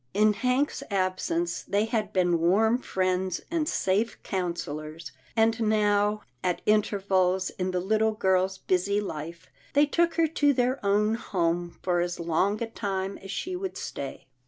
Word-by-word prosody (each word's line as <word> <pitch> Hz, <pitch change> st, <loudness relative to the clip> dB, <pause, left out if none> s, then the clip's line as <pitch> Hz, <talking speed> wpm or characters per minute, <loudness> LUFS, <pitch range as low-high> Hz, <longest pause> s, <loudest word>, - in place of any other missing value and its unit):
In 210 Hz, +1 st, +5 dB
Hank's 250 Hz, +6 st, 0 dB
absence, 185 Hz, -3 st, -1 dB
they 205 Hz, +2 st, 0 dB
had 225 Hz, -2 st, -1 dB
been 175 Hz, -2 st, +2 dB
warm 220 Hz, +8 st, +3 dB
friends 185 Hz, -4 st, -1 dB
and 320 Hz, -3 st, 0 dB
safe 205 Hz, +5 st, 0 dB
counsellors, 165 Hz, -4 st, -4 dB, 0.2 s
and 225 Hz, 0 st, +3 dB
now, 210 Hz, -1 st, +2 dB, 0.2 s
at 180 Hz, -1 st, -1 dB
intervals 190 Hz, -3 st, +2 dB
in 185 Hz, 0 st, -3 dB
the 185 Hz, -1 st, 0 dB
little 220 Hz, +4 st, +1 dB
girl's 190 Hz, -2 st, +1 dB
busy 190 Hz, +3 st, +1 dB
life, 165 Hz, -3 st, -6 dB, 0.3 s
they 290 Hz, +1 st, +5 dB
took 335 Hz, +3 st, +1 dB
her 330 Hz, -, +4 dB
to 290 Hz, -2 st, +2 dB
their 255 Hz, 0 st, 0 dB
own 210 Hz, +2 st, +2 dB
home 175 Hz, -5 st, -1 dB
for 175 Hz, -1 st, +1 dB
as 175 Hz, 0 st, -2 dB
long 185 Hz, +6 st, +1 dB
a -, -, -3 dB
time 195 Hz, -3 st, -3 dB
as 195 Hz, -, -11 dB
she 365 Hz, -, -3 dB
would 380 Hz, +1 st, -4 dB
stay. -, -, -6 dB
200 Hz, 155 wpm, -27 LUFS, 180-220 Hz, 0.3 s, In